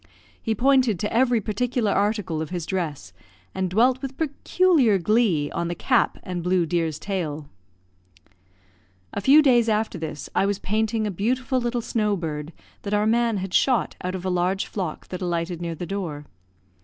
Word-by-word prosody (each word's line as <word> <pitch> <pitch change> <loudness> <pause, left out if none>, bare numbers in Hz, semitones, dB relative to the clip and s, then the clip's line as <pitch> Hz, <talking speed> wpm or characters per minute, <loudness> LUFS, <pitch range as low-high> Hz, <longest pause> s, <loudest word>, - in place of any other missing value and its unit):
He 225 - -1
pointed 255 -3 +3
to 210 - -2
every 240 0 +3
particular 220 +1 -1
article 205 -6 0
of 160 - -4
his 175 -2 -4
dress, 155 - -4 0.4
and 190 -1 -1
dwelt 245 +7 +3
with 270 -1 -6
peculiar 305 - +2
glee 185 -6 +2
on 170 - -2
the 175 - -3
cap 250 +7 +1
and 180 -2 -4
blue 180 0 +2
deer's 165 -2 -1
tail. 160 -7 -4 1.7
A 200 - -3
few 285 +8 +6
days 240 -4 +4
after 215 -3 0
this, 155 -2 -5
I 195 - +2
was 200 -1 0
painting 220 +2 -1
a 210 - -1
beautiful 255 +7 0
little 240 0 -1
snow 210 -3 0
bird, 155 -2 -4 0.3
that 205 0 -2
our 210 0 +2
man 230 0 +2
had 190 -1 -5
shot 250 -6 +2
out 180 +1 -2
of 185 0 -6
a 185 - 0
large 180 +2 0
flock 180 -7 -5
that 180 0 -6
alighted 170 -1 -2
near 170 -1 -3
the 175 - -5
door. 170 -7 -4
200 Hz, 175 wpm, -24 LUFS, 175-235 Hz, 1.7 s, few